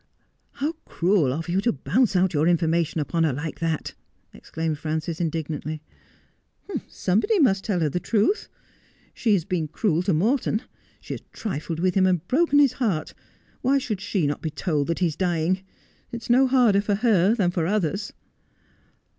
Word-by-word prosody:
' - - -46
How 290 +3 -1
cruel 175 -6 +2
of 160 +5 -4
you 180 +3 +1
to 235 - +2
bounce 210 - +1
out 180 0 +3
your 155 +1 +2
information 165 -1 +1
upon 165 +2 0
her 160 - +2
like 145 +4 -5
that! 165 -2 -2 0.2
' - - -43
exclaimed 160 -2 -4
Frances 160 +2 -3
indignantly. 155 -1 -3 0.5
' - - -44 0.2
Somebody 215 - +1
must 195 - +3
tell 190 -5 -1
her 155 - +2
the 180 - -2
truth. 225 - +1 0.6
She 220 - +1
has 175 -5 +1
been 170 -4 -1
cruel 170 +1 0
to 190 +2 0
Morton. 220 - +1 0.4
She - - -6
has - - -7
trifled 165 -5 -4
with 180 +1 +1
him 185 0 +3
and 180 -2 0
broken 290 +1 +3
his 280 -3 +5
heart. 180 -10 0 0.5
"Why 270 +3 +3
should 220 -7 -3
she 195 -5 0
not 145 0 -2
be 160 - -2
told 150 -1 -1
that 170 - -1
he 185 - +1
is 160 -3 -1
dying 175 -1 +1
1 190 - -22 0.5
It 235 - -4
is - - -10
no 260 +2 +5
harder 245 -6 +4
for 205 0 0
her 210 -2 +3
than 190 -6 +1
for 170 -2 -1
others.' 200 0 -1
180 Hz, 190 wpm, -24 LUFS, 160-215 Hz, 0.6 s, his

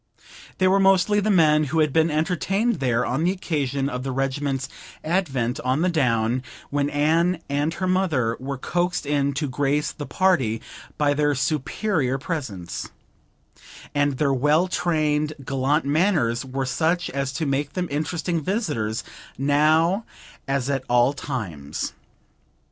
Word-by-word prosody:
They 185 - +3
were 195 +1 +4
mostly 195 +2 +4
the 210 +1 0
men 155 -5 +4
who 150 +4 -2
had 155 -3 +2
been 160 0 +3
entertained 190 +7 0
there 125 -2 +1
on 135 +6 -1
the 175 - +3
occasion 140 -7 -1
of 125 -3 -3
the 135 +1 -3
regiment's 135 0 -1 0.4
advent 140 -8 0
on 130 +4 0
the 185 - +3
down, 125 -5 +1 0.3
when 145 0 +1
Anne 165 +5 +2
and 145 +3 +1
her 185 - -2
mother 165 -11 +1
were 135 +1 -4
coaxed 175 +4 -1
in 140 -1 +1
to 145 +2 -2
grace 145 +2 0
the 145 - -7
party 150 - +2 0.4
by 145 -1 +2
their 145 0 +1
superior 145 +1 0
presence; 130 - -5 1.0
and 145 0 +2
their 140 +1 +1
well 150 +7 +3
trained, 155 -4 0
gallant 135 +3 +1
manners 145 - +2
were 135 +1 -3
such 165 +7 0
as 140 0 -2
to 155 +4 -2
make 140 +1 -1
them 180 -1 -2
interesting 160 +3 -1
visitors 145 - -2 0.3
now 155 - +3 0.4
as 135 -1 0
at 135 -2 -1
all 120 +2 +4
times. 90 - -4
145 Hz, 145 wpm, -23 LUFS, 135-170 Hz, 1.0 s, were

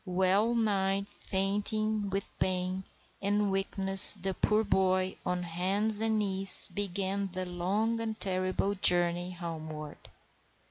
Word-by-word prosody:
Well 190 +4 0
nigh 200 -3 -1
fainting 205 +2 -1
with 195 0 -3
pain, 185 0 -2 0.4
and 205 0 -1
weakness, 195 0 +5
the 190 0 -4
poor 215 +3 0
boy, 185 -2 -1
on 180 0 -3
hands 195 +5 -1
and 220 -1 0
knees, 195 -2 +4
began 195 0 -2
the 185 0 -4
long 195 +6 -3
and 220 -1 -6
terrible 185 +1 -1
journey 175 -2 +4
homeward. 160 -4 -9
195 Hz, 120 wpm, -28 LUFS, 185-205 Hz, 0.4 s, weakness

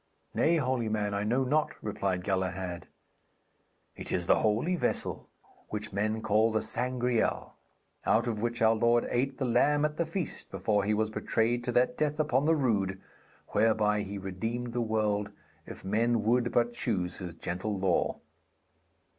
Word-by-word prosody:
'Nay, 170 - +3
holy 130 -5 0
man, 105 -1 -1
I 100 0 -1
know 120 +5 +1
not,' 150 +4 +1
replied 95 -3 -2
Galahad. 95 -2 -2 1.1
'It - - -7
is 90 -2 0
the - - +4
holy 115 +12 +1
vessel - - -2 0.4
which 105 -1 -4
men 110 +2 -1
call 110 +1 +3
the 110 - +1
Sangreal, 125 -1 0 0.5
out - - +3
of 110 -3 -2
which 120 0 -1
our 110 0 +6
Lord 120 +1 +3
ate 130 +2 0
the 135 - -1
lamb 145 +5 +3
at 150 0 -2
the 170 - +1
feast 170 0 -4
before 100 +1 0
He 105 - +2
was 110 0 0
betrayed 115 +2 0
to 125 - 0
that 125 +1 +2
death 150 0 0
upon 145 -2 +2
the 160 +1 +4
rood 100 -9 0 0.5
whereby 105 -1 +2
He 100 0 -5
redeemed 115 +6 -4
the 120 - 0
world, 105 -2 0 0.4
if - - -9
men 115 +3 +1
would 120 +2 +2
but 120 0 +2
choose 90 -7 -2
His 90 -3 -6
gentle 95 +5 -3
law.' 95 -2 +1
110 Hz, 165 wpm, -30 LUFS, 100-125 Hz, 1.1 s, our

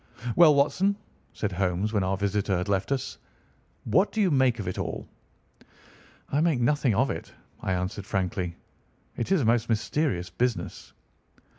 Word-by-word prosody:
"Well, 160 -4 +7
Watson," 150 +8 +2 0.4
said 105 - -3
Holmes 95 +3 -1
when 100 -3 +2
our 95 +1 0
visitor 100 -1 0
had 90 - -2
left 100 +4 0
us, 135 -1 -2 0.6
"what 185 - +2
do 220 - -3
you 195 -4 +3
make 130 -4 +3
of 105 -5 -5
it 90 - -3
all?" - - -4 1.2
"I 145 - +2
make 160 -6 +2
nothing 125 -2 +2
of - - +2
it," - - -6 0.3
I 95 - -1
answered 90 +2 -3
frankly. 90 -3 -2 0.6
"It 120 - -3
is 190 -5 +4
a - - 0
most 115 +1 +2
mysterious 115 - 0
business." 125 -2 -2
110 Hz, 160 wpm, -27 LUFS, 95-140 Hz, 1.2 s, Well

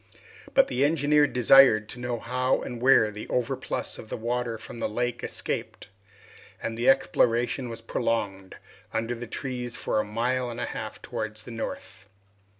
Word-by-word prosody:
But 270 0 +6
the 130 - 0
engineer 145 0 +4
desired 125 -4 +6
to 125 - -7
know 120 -1 -2
how 125 +3 0
and 120 -1 -6
where 125 -4 +5
the 105 +1 -8
overplus 125 -2 -2
of 110 - -10
the - - -4
water 120 0 -2
from 115 - -9
the - - -1
lake 120 +2 -2
escaped, - - -4 0.7
and 115 - -4
the 120 +2 +2
exploration 120 -1 +2
was 115 0 -7
prolonged 100 -4 -2 0.4
under 115 +2 -1
the 120 0 -7
trees 125 0 -4
for 110 - -1
a - - +1
mile 120 +4 -1
and 120 0 -6
a - - -1
half - - -6
towards 110 0 -5
the 120 - -10
north. 110 -2 -7
120 Hz, 165 wpm, -27 LUFS, 110-125 Hz, 0.7 s, But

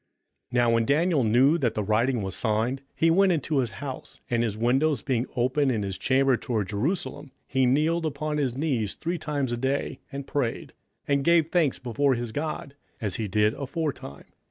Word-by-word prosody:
27:006:010 - - -16
Now 115 - +3
when 115 0 +2
Daniel 155 -1 +3
knew 125 +8 +4
that 125 -6 0
the 105 - -1
writing 115 +3 +1
was 95 -1 -4
signed, 115 +4 0
he 165 0 +3
went 190 +2 +4
into 155 -3 0
his 120 -5 -1
house; 135 +4 -7
and 120 -1 +2
his 110 -3 -1
windows 130 +3 +1
being 125 -2 0
open 130 +3 +2
in 110 -5 0
his 95 -1 -3
chamber 135 +3 +3
toward 110 -4 -2
Jerusalem, 145 - -2
he 130 -1 +1
kneeled 160 +5 +2
upon 150 +1 -3
his 130 -4 0
knees 130 -9 -1
three 170 +1 -3
times 145 -4 -2
a 120 - -1
day, 135 +3 -2
and 140 -1 -5
prayed, 130 -6 -2 0.3
and 140 -1 +2
gave 165 0 +4
thanks 165 -7 +2
before 130 +3 +1
his 120 -1 -4
God, 145 0 -4 0.3
as 105 -6 -3
he 110 - -2
did 105 +2 +2
aforetime. 140 - -5
130 Hz, 190 wpm, -26 LUFS, 115-150 Hz, 0.3 s, knew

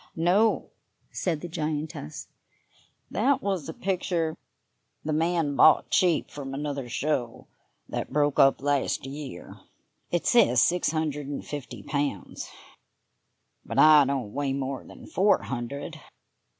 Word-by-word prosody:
"No," 185 +7 +2 0.4
said 165 -5 -2
the 175 - -5
giantess; 155 - -4 0.8
"that 270 +5 +1
was 190 -7 -2
a - - -4
picture 175 -4 -1 0.7
the 155 - -1
man 165 -2 +1
bought 155 - +5
cheap 175 -4 +2
from 135 -2 -6
another 140 -3 -4
show 125 -2 -2 0.4
that - - -4
broke 145 0 +1
up 135 0 +5
last 145 -2 0
year. 135 -8 -8 0.5
It 175 - -1
says 180 - +5
six 175 +7 +3
hundred 150 -3 -2
and 145 - -5
fifty 125 -7 -7
pounds, 140 - -3 1.1
but - - -6
I 155 -1 +8
don't 130 -6 -2
weigh 140 -1 -1
more 135 -1 -3
than - - -13
four 200 +2 +2
hundred. 140 +6 -5
150 Hz, 125 wpm, -27 LUFS, 135-165 Hz, 1.1 s, I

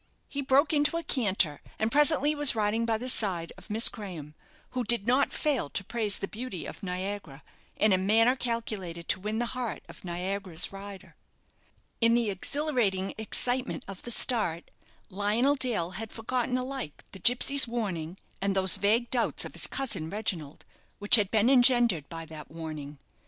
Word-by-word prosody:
He 280 - -4
broke 280 +3 +3
into 295 +2 +2
a 335 - -4
canter, 195 - 0 0.2
and 220 +1 -1
presently 295 +1 +4
was 290 -4 +6
riding 220 +2 0
by 225 -1 +1
the 250 +3 -6
side 185 -9 +1
of - - -16
Miss 220 +3 +7
Graham, 175 -9 -6 0.4
who 250 -1 -2
did 235 -2 +1
not 255 +4 +2
fail 275 - -1
to 200 - -2
praise 215 -1 0
the 195 - -4
beauty 215 -6 -6
of - - -9
"Niagara" 185 -5 -5 0.3
in 215 -2 +3
a 185 - +3
manner 225 +6 +3
calculated 215 -9 -4
to - - +2
win 210 +3 -3
the 240 - 0
heart 250 -3 -4
of - - -13
Niagara's 180 0 -2
rider. 195 0 -10 0.8
In 230 0 +4
the 235 -3 +1
exhilarating 205 -4 -1
excitement 245 +4 -1
of 195 -2 -8
the - - -8
start, 215 -9 0 0.4
Lionel 210 +8 +2
Dale 235 -11 -2
had 215 +4 -6
forgotten 250 +2 -2
alike 255 - -5
the 190 - -10
gipsy's 255 +6 +4
warning 190 -8 -4 0.2
and 195 0 0
those 190 -2 +4
vague 225 +4 +1
doubts 245 -2 +1
of - - -8
his - - +1
cousin 195 -12 -1
Reginald 175 -8 -4 0.3
which 210 +4 +6
had 205 -4 +2
been 220 +1 +2
engendered 240 - +4
by 165 0 -7
that 155 -1 -10
warning. 155 -3 -7
215 Hz, 170 wpm, -28 LUFS, 185-245 Hz, 0.8 s, Miss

